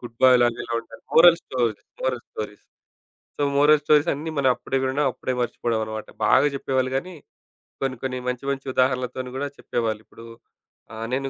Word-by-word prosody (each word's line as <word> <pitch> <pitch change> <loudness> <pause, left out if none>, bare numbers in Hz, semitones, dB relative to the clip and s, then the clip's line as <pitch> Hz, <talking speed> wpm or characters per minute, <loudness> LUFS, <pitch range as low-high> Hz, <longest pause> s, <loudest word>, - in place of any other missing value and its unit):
Good 120 -2 -10
బాయ్‌లాగా 120 -2 +5
ఎలా 120 0 -4
ఉండాలి? 115 - -15
Moral 170 0 +8
stories, 120 -5 -1 0.2
moral 125 -2 -1
stories. 105 -1 -7 0.8
So - - -3
moral 145 +1 +5
stories 150 +2 +4
అన్నీ 155 +3 -5
మనం 135 -2 +3
అప్పుడే 135 - -2
వినడం, 135 +3 0
అప్పుడే 130 - -4
మర్చిపోవడం 120 -1 -1
అనమాట. 110 0 -6 0.2
బాగా 130 +6 +5
జెప్పేవాళ్ళు 130 -1 -1
గాని, 180 +7 -3 0.7
కొన్ని 130 -2 -1
కొన్ని 130 -1 -2
మంచి 125 +1 -2
మంచి 135 0 -4
ఉదాహరణలతోని 130 0 0
గూడా, 145 +2 -2
చెప్పేవాళ్ళు. 110 -2 -2
ఇప్పుడు 115 - -14 0.7
ఆహ్, 110 +1 -5
నేను 135 +1 -1
130 Hz, 165 wpm, -24 LUFS, 120-140 Hz, 0.8 s, Moral